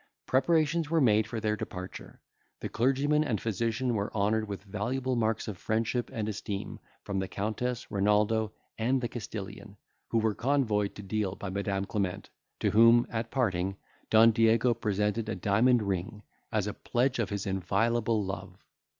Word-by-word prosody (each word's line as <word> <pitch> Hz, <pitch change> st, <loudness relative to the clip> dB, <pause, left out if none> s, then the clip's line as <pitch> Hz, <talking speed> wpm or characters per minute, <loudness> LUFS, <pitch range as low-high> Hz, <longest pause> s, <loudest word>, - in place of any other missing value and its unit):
Preparations 160 Hz, +3 st, +2 dB
were 165 Hz, 0 st, +3 dB
made 110 Hz, -5 st, +4 dB
for 115 Hz, +1 st, -4 dB
their 105 Hz, -1 st, 0 dB
departure; 95 Hz, -2 st, -8 dB, 0.4 s
the -, -, -4 dB
clergyman 140 Hz, +5 st, +2 dB
and 115 Hz, -9 st, -1 dB
physician 115 Hz, +3 st, -1 dB
were 100 Hz, -2 st, -1 dB
honoured 110 Hz, +1 st, +1 dB
with 100 Hz, -1 st, -6 dB
valuable 125 Hz, +6 st, -2 dB
marks 110 Hz, -1 st, 0 dB
of 100 Hz, -5 st, -5 dB
friendship 115 Hz, +2 st, -1 dB
and 110 Hz, -5 st, -3 dB
esteem 100 Hz, -1 st, -4 dB, 0.2 s
from 100 Hz, -1 st, -2 dB
the 95 Hz, -, -2 dB
Countess, 110 Hz, +5 st, -3 dB
Renaldo, 105 Hz, +2 st, +2 dB, 0.3 s
and 125 Hz, +4 st, +2 dB
the 120 Hz, -, -2 dB
Castilian, 105 Hz, -3 st, -7 dB, 0.3 s
who 115 Hz, -, 0 dB
were 110 Hz, -1 st, +2 dB
convoyed 115 Hz, -6 st, +1 dB
to 105 Hz, -, -8 dB
Deal 100 Hz, -1 st, -2 dB
by 100 Hz, -2 st, -6 dB
Madam 100 Hz, 0 st, -1 dB
Clement, 100 Hz, -3 st, -3 dB, 0.3 s
to -, -, +2 dB
whom, 115 Hz, +2 st, +6 dB
at 110 Hz, 0 st, -2 dB
parting, 95 Hz, -7 st, 0 dB, 0.3 s
Don 115 Hz, +1 st, +7 dB
Diego 115 Hz, +2 st, +4 dB
presented 105 Hz, 0 st, -1 dB
a 110 Hz, -, -1 dB
diamond 110 Hz, +6 st, +3 dB
ring, 100 Hz, +2 st, -3 dB, 0.3 s
as 110 Hz, -3 st, +1 dB
a 105 Hz, -, -3 dB
pledge 125 Hz, +2 st, 0 dB
of 115 Hz, -, 0 dB
his 100 Hz, 0 st, -3 dB
inviolable 105 Hz, +3 st, +1 dB
love. 95 Hz, 0 st, -7 dB
110 Hz, 160 wpm, -29 LUFS, 100-120 Hz, 0.4 s, Don